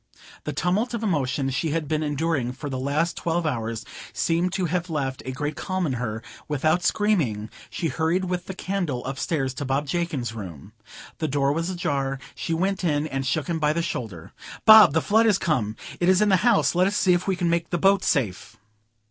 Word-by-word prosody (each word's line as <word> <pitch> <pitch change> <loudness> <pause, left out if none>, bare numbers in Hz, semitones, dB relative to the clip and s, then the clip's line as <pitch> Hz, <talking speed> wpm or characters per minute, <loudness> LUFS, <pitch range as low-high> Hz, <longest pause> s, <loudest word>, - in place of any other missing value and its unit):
The - - -2
tumult 210 +8 0
of 230 - -4
emotion 140 -7 0
she 160 +5 -1
had 155 0 -1
been 155 +1 0
enduring 145 -4 -1
for 140 +2 -6
the 130 - -3
last 150 +6 0
twelve 170 0 -1
hours 115 -6 -2 0.3
seemed 170 +2 +1
to 185 - 0
have 175 +1 -2
left 135 -4 -2
a - - -2
great 145 +4 -3
calm 185 -1 -2
in 140 - -1
her; 115 -2 -3 0.2
without 155 +4 +1
screaming, 145 - +1 0.2
she 170 - -2
hurried 165 +6 0
with 180 -1 -3
the 190 - -5
candle 180 -10 -2
upstairs 135 0 -2
to 140 - -5
Bob 135 +2 0
Jakin's 145 -7 -2
bedroom. 100 -4 -9 0.5
The 155 - 0
door 140 0 +1
was 165 +3 -2
ajar; 140 -7 -1 0.2
she - - -5
went 190 +4 0
in 150 -3 +1
and 135 -3 -3
shook 145 +2 0
him 165 +1 -2
by 150 0 +2
the 170 +1 -1
shoulder. 105 - -5 0.3
"Bob, 220 -8 +9
the 160 - +2
flood 225 +2 +4
is 205 -3 +4
come! 125 - 0 0.2
it 175 - +2
is 185 0 +5
in 210 - +3
the 190 - +5
house; 235 +3 +3
let 180 +2 +3
us 200 - -1
see 185 - +4
if 175 +2 0
we 190 - +2
can 175 -1 -1
make 170 0 0
the 175 - 0
boats 195 +2 +3
safe." 115 - -1
160 Hz, 210 wpm, -24 LUFS, 135-180 Hz, 0.5 s, Bob